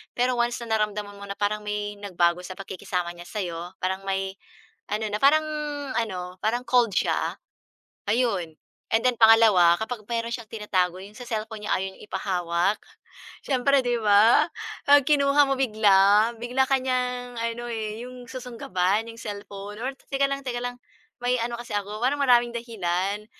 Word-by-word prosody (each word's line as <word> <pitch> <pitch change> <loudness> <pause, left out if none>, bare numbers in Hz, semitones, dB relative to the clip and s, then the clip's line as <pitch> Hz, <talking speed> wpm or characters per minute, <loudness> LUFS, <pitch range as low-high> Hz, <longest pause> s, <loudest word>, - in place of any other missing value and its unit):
Pero 250 +1 +1
once 240 0 +1
na 220 -1 0
naramdaman 210 -1 -3
mo 200 - -8
na 200 - -5
parang 210 +1 0
may 205 0 -3
nagbago 175 -3 +1
sa 185 - -7
pagkikisama 180 -2 -4
niya 175 0 -11
sa'yo, 175 -3 -5
parang 190 +1 -2
may 195 0 -2 0.5
ano 215 +1 -1
na 210 - 0
parang 310 +3 +5 0.6
ano 185 -5 -4
parang 240 +3 0
cold 245 -3 +3
siya. - - 0 0.7
Ayun 205 -8 0 0.4
and 225 - +3
then 250 - +2
pangalawa, 220 -6 +7
kapag 220 0 -4
meron 230 0 -2
siyang 230 -3 -11
tinatago 185 -5 0
'yung 200 +2 -11
sa 250 - -8
cellphone 220 -2 -4
niya - - -2
ayaw 190 +1 -2
niya - - -17
ipahawak. 180 +1 0 0.7
Siyempre, 275 +1 +3
di 245 0 +1
ba, 210 +2 +5 0.4
'pag 285 0 +7
kinuha 285 -1 +5
mo 270 - +2
bigla, 210 -2 +4
bigla 250 +3 +1
ka 270 - +5
niyang 250 -1 -2
ano, 230 +1 -3
eh, 220 0 -4
'yung 250 -1 -10
susunggaban 225 -5 -1
'yung 230 - -9
cellphone 205 0 -7
or 265 +2 -2 0.2
teka 275 0 +2
lang 275 0 -3
teka 240 -1 -2
lang 245 0 -3 0.5
may 250 0 +2
ano 235 0 -2
kasi 240 - -9
ako, 205 +1 -3
parang 285 +3 +1
maraming 240 -3 +4
dahilan. 200 -3 -2
220 Hz, 165 wpm, -25 LUFS, 195-245 Hz, 0.7 s, pangalawa